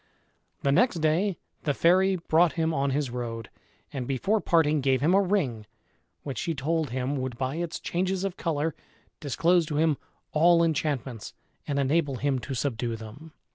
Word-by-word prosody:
The 140 - +3
next 240 - +3
day 165 +4 +1 0.2
the 145 -2 -1
fairy 185 +3 +4
brought 170 -1 +2
him 165 -1 0
on 140 -1 +1
his 135 -2 -1
road, 115 -3 -5 0.4
and 130 -3 -4
before 195 - 0
parting 155 -4 +3
gave 130 -1 +2
him 155 +7 +2
a 195 - +5
ring, 145 - -1 0.6
which 135 -3 -4
she 165 - -2
told 155 +2 -1
him 130 +3 -2
would 130 -2 -4
by 130 +4 -2
its 170 -1 -3
changes 185 +2 -1
of 195 -2 -2
color 160 -2 -1 0.5
disclose 165 +4 +2
to 155 - -3
him 155 -1 +2 0.3
all 170 +2 +5
enchantments, 140 -7 -2 0.3
and 140 - -1
enable 140 +1 +1
him 135 +1 0
to 130 +3 -5
subdue 120 -3 -2
them. 115 +9 -11
150 Hz, 170 wpm, -27 LUFS, 130-170 Hz, 0.6 s, a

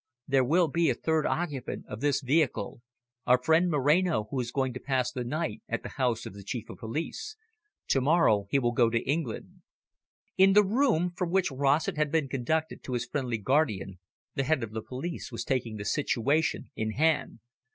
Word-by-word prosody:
There 135 -1 +3
will 165 +7 +3
be 165 +2 +1
a 125 - +1
third 160 +3 0
occupant 150 -7 -3
of 105 +2 -7
this 140 -1 +1
vehicle 135 -2 0 0.5
our 125 - +6
friend 160 +7 +3
Moreno, 150 -1 +2
who 135 - -1
is 120 -1 -3
going 130 -1 -1
to 130 - -6
pass 130 -3 0
the 125 - -4
night 155 +7 -3
at - - -2
the - - -6
house 120 -4 -1
of - - -7
the 100 0 -10
Chief 115 +2 -5
of - - -12
Police. 160 - -4 0.5
To 135 - +3
morrow 130 -9 +3
he 140 - +2
will 120 -3 +1
go 120 -1 +3
to 115 0 +1
England." 140 -5 -3 0.8
In 195 +1 +7
the 210 +1 +7
room 210 - +2
from 180 -1 -2
which 185 -2 +1
Rossett 145 +6 +1
had 150 -1 +1
been 155 -4 +1
conducted 155 +5 -1
to 130 - -5
his 120 -1 -1
friendly 125 -5 -2
guardian, 105 - 0 0.3
the 135 - 0
head 140 -2 +1
of 110 - -5
the 110 0 -4
police 145 +5 -6
was 115 - -4
taking 120 -4 -1
the 100 - -6
situation 145 +3 0
in 110 0 -2
hand. 155 -3 +1
135 Hz, 195 wpm, -28 LUFS, 120-160 Hz, 0.8 s, In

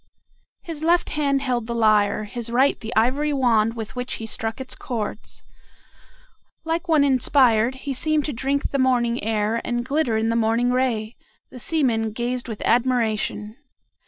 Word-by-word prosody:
His 325 -4 -7
left 340 +2 +2
hand 280 -2 0
held 245 -4 -1
the 235 - -3
lyre, 215 -2 +3
his 230 +2 -6
right 260 +4 +2
the 225 -1 -7
ivory 265 +7 +2
wand 230 -4 +2
with 225 0 -7
which 250 0 -4
he 225 - -5
struck 225 +1 -3
its 265 - -5
chords. 220 -3 -5 1.2
Like 330 +2 -2
one 315 -3 +4
inspired, 255 -3 +3
he 280 - -2
seemed 305 +3 +1
to 295 - -3
drink 275 +4 -1
the 275 - -1
morning 245 -3 +1
air 220 +1 0
and 240 0 -2
glitter 275 -5 0
in 225 +1 0
the 230 - 0
morning 230 +2 +2
ray. 245 -3 -1 0.3
The 250 - -10
seamen 230 -7 0
gazed 245 +2 -3
with 220 -3 -6
admiration. 230 -3 0
240 Hz, 160 wpm, -23 LUFS, 225-275 Hz, 1.2 s, one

